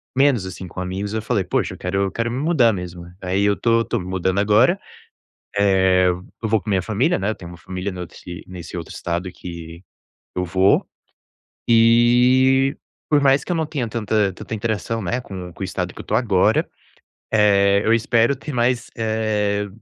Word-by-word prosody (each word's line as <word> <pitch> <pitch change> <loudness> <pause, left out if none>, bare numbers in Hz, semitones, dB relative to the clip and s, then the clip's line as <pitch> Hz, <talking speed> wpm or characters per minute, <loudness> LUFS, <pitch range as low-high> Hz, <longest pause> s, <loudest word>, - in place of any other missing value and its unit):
menos 135 -7 +3
assim 95 0 -7
com 90 - -9
amigos 95 +3 -4
e - - -1
eu - - -2
falei 105 -2 0
poxa, 90 - -1
eu - - -14
quero 95 +2 -1
eu 95 - -3
quero 115 +3 -2
me 120 - -3
mudar 145 -6 +3
mesmo. 90 -2 -7 0.2
Aí 95 +2 0
eu 100 0 +3
tô 115 -1 +2
tô - - -2
me 90 - -7
mudando 95 +1 -1
agora. 110 - +4 0.8
Eh, 95 -2 +4
eu 90 +5 -5
vou 110 0 +3
com - - -22
a - - 0
minha 95 -1 +2
família, 115 - +1
né. 95 +2 -1
Eu 110 - -2
tenho 85 - -10
uma 85 - -11
família 95 +4 -5
no 90 -1 -5 0.4
nesse 90 -2 -9
outro 85 - -7
estado 85 +2 -3
que 85 -1 -9 0.5
eu 90 - -1
vou, 95 +3 +2 0.8
e 125 +3 +4 0.3
por 150 -1 +4
mais 135 0 +4
que - - -10
eu - - 0
não 160 - 0
tenha 140 -6 -3
tanta 110 -3 0
tanta 115 - -7
interação, 110 0 -2
né, 115 +7 -1
com 90 -5 -8
com - - -20
o - - 0
estado 90 -1 -4
que - - -10
eu - - -8
tô - - -3
agora, 110 -5 +2 0.6
eh, 100 -2 +4
eu 115 - +3
espero 115 +3 +2
ter 150 +3 -7
mais, 120 -1 +1
eh, 110 -2 0
105 Hz, 200 wpm, -21 LUFS, 95-120 Hz, 0.8 s, agora